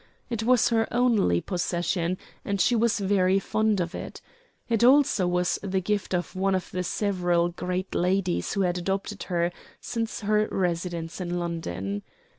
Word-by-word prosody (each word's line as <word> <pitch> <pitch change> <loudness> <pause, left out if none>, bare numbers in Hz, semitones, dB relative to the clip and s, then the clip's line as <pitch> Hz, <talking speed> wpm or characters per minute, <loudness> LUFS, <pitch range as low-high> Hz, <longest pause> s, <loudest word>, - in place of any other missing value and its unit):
It 230 -2 -1
was 245 +1 +4
her 225 -1 +2
only 230 - +3
possession, 175 0 -1 0.3
and 200 -1 -2
she 240 +6 +3
was 230 -1 +2
very 190 -1 +3
fond 215 +1 +1
of 175 0 -2
it. - - -7 0.5
It 230 -1 +1
also 255 -7 +5
was 180 0 +1
the 190 -1 -1
gift 200 0 -1
of 175 0 -3
one 190 +1 +1
of 185 - -3
the 180 0 -2
several 175 -2 +1
great 180 +2 -3
ladies 180 0 0
who 200 - 0
had 180 -1 +1
adopted 195 +3 -3
her 175 -1 +1 0.3
since 230 -1 -3
her 215 +1 +2
residence 170 -1 -2
in 175 0 -2
London. 100 - -3
185 Hz, 160 wpm, -26 LUFS, 175-210 Hz, 0.5 s, also